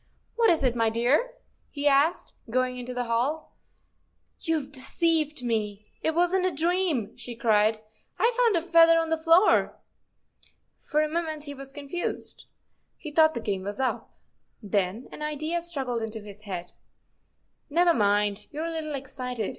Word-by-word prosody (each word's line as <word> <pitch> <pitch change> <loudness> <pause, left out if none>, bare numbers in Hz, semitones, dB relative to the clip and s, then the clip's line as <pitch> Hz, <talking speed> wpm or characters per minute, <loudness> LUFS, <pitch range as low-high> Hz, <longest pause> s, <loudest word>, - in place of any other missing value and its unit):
What 465 -1 +4
is 325 -4 +3
it, 250 -2 +2
my 225 -1 +2
dear? 255 - +1 0.2
" - - -42
he 285 +1 +1
asked, 285 +4 +2 0.2
going 255 +2 0
into 250 0 -6
the 250 0 -2
hall. 245 +7 -1 0.5
" - - -45
You've 310 -4 -1
deceived 305 +1 0
me, 210 -3 -3
it 320 - 0
wasn't 360 +2 +2
a - - 0
dream," 325 - 0
she 240 - -8
cried; 220 -1 +2 0.4
I've 475 +1 +3
found 465 -3 +3
a 335 - +1
feather 330 -1 +6
on 325 -1 0
the 325 - +2
floor! 330 +5 +4 0.5
" - - -34
For 305 +1 +3
a - - 0
moment 315 -1 -2
he 285 -1 -6
was 275 -1 -10
confused. 290 +5 -5 0.5
He 305 - -8
thought 315 +1 +4
the 235 - -3
game 200 -3 -2
was 205 +5 -6
up. 260 -1 -2 0.4
Then 205 +2 -1
an - - -10
idea 310 +3 -2
struggled 270 -9 -3
into 220 0 -4
his 205 0 -12
head. 180 -2 -5 0.5
" - - -47
Never 340 +3 +4
mind; 205 -2 +1
you 300 - -8
're - - -2
a 335 - -3
little 310 -2 -3
excited. 250 -5 -4
280 Hz, 175 wpm, -27 LUFS, 230-330 Hz, 0.5 s, feather